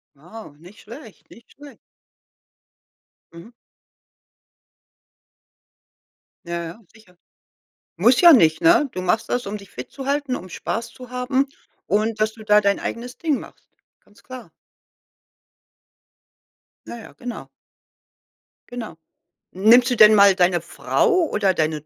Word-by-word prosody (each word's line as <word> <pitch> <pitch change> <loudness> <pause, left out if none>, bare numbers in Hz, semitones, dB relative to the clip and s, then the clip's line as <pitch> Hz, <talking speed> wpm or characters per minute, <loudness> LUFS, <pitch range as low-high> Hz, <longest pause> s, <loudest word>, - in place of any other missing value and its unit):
Wow, 175 +2 -13
nicht 180 +6 -17
schlecht, 230 -1 -14
nicht 235 - -19
schlecht. 290 0 -15 1.6
Mhm. 170 +8 -14 2.9
Ja, 170 0 -5
ja. 170 +5 -9
Sicher. 195 -6 -22 0.8
Muss 235 +8 +3
ja 345 -1 +8
nicht, 160 - +3
ne? 275 - +4
Du 185 - -5
machst 220 +5 -1
das, 245 -3 -3
um 205 +1 -5
dich 200 -2 -16
fit 125 - -10
zu 270 -1 -9
halten, 280 -2 -2
um 185 - -10
Spaß 230 +6 -5
zu 250 +2 -14
haben 250 +2 -1 0.4
und 215 +2 -1
dass 215 0 0
du 220 -1 -14
da 210 0 +4
dein 200 -1 0
eigenes 245 +1 -7
Ding 310 -5 -1
machst. - - -15 0.4
Ganz 210 +3 -25
klar. 255 -1 -12 2.4
Ja, 235 - -8
ja, 225 - -13
genau. 245 0 -9 1.2
Genau. 230 -8 -8 0.6
Nimmst 235 +6 +4
du 245 - +1
denn 215 -1 +7
mal 200 -1 +6
deine 180 -1 +1
Frau 275 - -1 0.2
oder 200 -3 0
deine 155 -2 -2
220 Hz, 130 wpm, -21 LUFS, 185-245 Hz, 2.9 s, ja